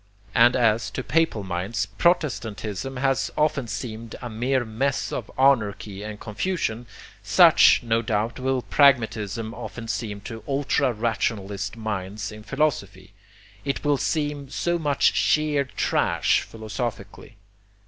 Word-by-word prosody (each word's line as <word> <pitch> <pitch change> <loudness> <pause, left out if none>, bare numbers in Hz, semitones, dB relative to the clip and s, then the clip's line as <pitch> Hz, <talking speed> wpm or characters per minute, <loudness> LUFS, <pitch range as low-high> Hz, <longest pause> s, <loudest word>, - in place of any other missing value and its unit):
And 120 +2 +5
as, 115 -2 +2
to 130 - -2
papal 125 -2 +1
minds, 95 +5 -2
protestantism 115 - -1
has 135 0 +1
often 150 -4 +1
seemed 115 -1 -6
a 120 - -7
mere 125 +3 0
mess 130 +5 -1
of 115 - -4
anarchy 105 -7 +2
and 105 0 -7
confusion, 120 - -3 0.3
such, - - +6
no 115 -1 +1
doubt, 110 +2 -1
will 130 -1 0
pragmatism 115 -5 +2
often 115 0 -7
seem 110 -3 -3
to 110 +2 -8
ultra 140 -1 +1
rationalist 105 -2 -2
minds 105 -1 -4
in 110 0 -10
philosophy. 105 -8 -2 0.5
It 140 -1 -3
will 145 -1 +3
seem 145 -2 -2
so 175 +4 -1
much 145 -3 +2
sheer 150 -2 +2
trash, 130 - +1
philosophically. 110 -2 -6
115 Hz, 125 wpm, -24 LUFS, 105-135 Hz, 0.5 s, such